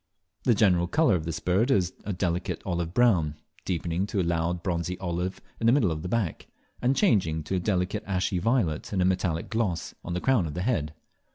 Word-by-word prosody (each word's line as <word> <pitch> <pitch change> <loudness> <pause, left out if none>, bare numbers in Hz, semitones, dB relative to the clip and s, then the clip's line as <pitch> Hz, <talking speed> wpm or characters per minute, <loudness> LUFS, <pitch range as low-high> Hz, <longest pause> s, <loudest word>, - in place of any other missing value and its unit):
The 120 - +4
general 90 -5 +3
colour 155 - +3
of 80 -4 0
this 80 -1 -3
bird 95 +8 +1
is 95 -8 +2
a 105 - -2
delicate 90 -1 -2
olive 85 -2 -2
brown, 90 -10 +3 0.3
deepening 85 +1 -1
to 105 - -2
a - - +2
loud 85 0 0
of 85 - -11
bronzy 90 0 -2
olive 90 +1 -3 0.2
in 115 - +1
the - - +7
middle 120 - +3
of 75 -1 -3
the 90 - -5
back, 105 -7 -1 0.3
and 130 +2 +2
changing 90 - +2
to 95 - -2
a - - 0
delicate 95 +2 -1
ashy 90 -1 0
violet 105 -7 0
with 100 - -1
a 90 - +3
metallic 90 -2 0
gloss, 105 -7 -1
on 85 - -4
the - - 0
crown 120 -6 +2
of 75 - -6
the 90 - -2
head. 80 -11 -1
90 Hz, 215 wpm, -27 LUFS, 85-105 Hz, 0.3 s, the